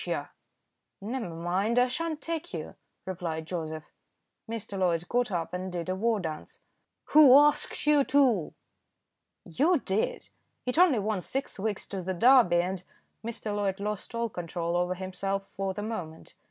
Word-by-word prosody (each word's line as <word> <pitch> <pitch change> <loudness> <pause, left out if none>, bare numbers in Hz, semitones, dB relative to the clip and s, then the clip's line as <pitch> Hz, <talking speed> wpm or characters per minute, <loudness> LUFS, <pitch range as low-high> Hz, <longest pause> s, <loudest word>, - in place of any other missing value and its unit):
Yah!" - - -3 0.7
"Never 225 0 -4
mind; 180 +7 -1
I 250 0 +5
sha'n't 315 +4 -3
take 330 - -4
you," 155 - -6 0.3
replied 170 -4 -4
Joseph. 160 -2 -4 0.7
Mr. 225 -3 -5
Loyd 175 -3 0
got 245 -1 +1
up 170 -4 -3
and 185 +1 -4
did 175 0 -4
a 185 - 0
war 225 +2 +1
dance. 160 -4 -6 0.5
"Who 285 -4 +9
asked 295 0 +3
you 295 -1 +5
to?" 255 - +2 0.9
"You 305 - +2
did. 195 +3 -2 0.4
It 250 +6 0
only 350 -8 +6
wants 205 -3 -2
six 270 -5 -3
weeks 205 0 -2
to 195 -2 -4
the 185 +1 -3
Derby, 220 -5 +5
and 185 0 -4 0.2
" - - -46
Mr. 220 -2 -4
Loyd 200 -1 -1
lost 210 +3 -4
all 235 0 0
control 170 -2 -3
over 180 +1 0
himself 195 +1 -3
for 195 -1 -2
the 205 - -4
moment. 175 -8 -6
195 Hz, 160 wpm, -28 LUFS, 175-245 Hz, 0.9 s, Who